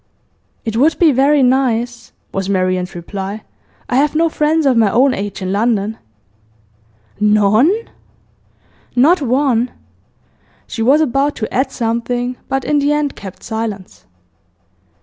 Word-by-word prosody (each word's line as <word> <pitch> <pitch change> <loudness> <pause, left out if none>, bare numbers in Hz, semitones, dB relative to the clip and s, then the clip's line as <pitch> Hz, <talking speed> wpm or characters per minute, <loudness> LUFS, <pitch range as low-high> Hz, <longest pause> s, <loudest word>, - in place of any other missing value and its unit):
'It 225 -1 -3
would 295 +7 +3
be 330 -3 +5
very 275 +2 +3
nice,' 245 -2 0 0.2
was 195 0 -2
Marian's 185 -1 -1
reply. 195 +4 -6 0.4
'I 250 - 0
have 295 +2 +2
no 330 +1 +3
friends 310 0 +1
of 265 -2 +3
my 225 -3 +4
own 255 +6 +3
age 200 0 -5
in 185 - -2
London.' 215 0 0 1.2
'None?' 210 - +4 1.2
'Not 300 +8 +4
one!' 255 -2 +1 1.0
She 225 - -6
was 275 +7 +4
about 280 0 +1
to 220 - -5
add 265 +1 0
something, 245 +1 -2
but 270 -1 -1
in 295 -1 +2
the 285 +1 +1
end 295 -1 -1
kept 190 -2 -10
silence. 220 -4 -6
245 Hz, 130 wpm, -16 LUFS, 210-280 Hz, 1.2 s, be